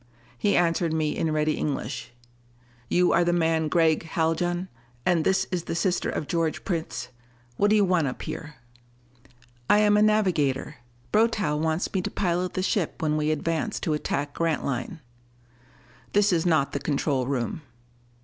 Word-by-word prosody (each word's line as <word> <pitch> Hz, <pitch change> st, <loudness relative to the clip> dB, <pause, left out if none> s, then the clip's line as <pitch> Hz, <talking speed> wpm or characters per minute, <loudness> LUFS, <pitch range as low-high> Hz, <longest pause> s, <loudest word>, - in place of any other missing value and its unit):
He 200 Hz, +12 st, +1 dB
answered 170 Hz, -1 st, +1 dB
me 155 Hz, -2 st, 0 dB
in 160 Hz, -, 0 dB
ready 155 Hz, 0 st, +1 dB
English: 140 Hz, -4 st, -3 dB, 0.8 s
"You 180 Hz, 0 st, +3 dB
are 175 Hz, -, +4 dB
the 175 Hz, -, +2 dB
man 165 Hz, -2 st, +1 dB
Gregg 160 Hz, -1 st, +3 dB
Haljan? 170 Hz, +2 st, -1 dB, 0.4 s
And 170 Hz, -3 st, +3 dB
this 190 Hz, +1 st, +2 dB
is 175 Hz, -2 st, -2 dB
the -, -, -3 dB
sister 180 Hz, +1 st, 0 dB
of -, -, -3 dB
George 165 Hz, 0 st, -1 dB
Prince 160 Hz, -8 st, -3 dB, 0.5 s
what 205 Hz, -, +3 dB
do 215 Hz, -, +4 dB
you 205 Hz, -2 st, +4 dB
want 180 Hz, -5 st, +2 dB
up 125 Hz, -, -5 dB
here?" 155 Hz, -1 st, -6 dB, 1.1 s
"I 205 Hz, -, +6 dB
am 210 Hz, 0 st, +4 dB
a -, -, +4 dB
navigator. 180 Hz, -10 st, +1 dB, 0.3 s
Brotow 215 Hz, -8 st, +2 dB
wants 160 Hz, +3 st, -1 dB
me 190 Hz, -, +1 dB
to -, -, -3 dB
pilot 180 Hz, -1 st, -1 dB
the 185 Hz, -, -1 dB
ship 190 Hz, -3 st, -1 dB
when 155 Hz, -1 st, +1 dB
we 155 Hz, 0 st, 0 dB
advance 160 Hz, +1 st, -1 dB
to 160 Hz, -, 0 dB
attack 145 Hz, -1 st, -2 dB
Grantline." 150 Hz, -4 st, -2 dB, 1.1 s
"This 205 Hz, -1 st, +4 dB
is 170 Hz, 0 st, +1 dB
not 155 Hz, -5 st, +2 dB
the 140 Hz, -, -2 dB
control 140 Hz, -3 st, -1 dB
room." 135 Hz, +2 st, -2 dB
165 Hz, 160 wpm, -26 LUFS, 150-180 Hz, 1.1 s, I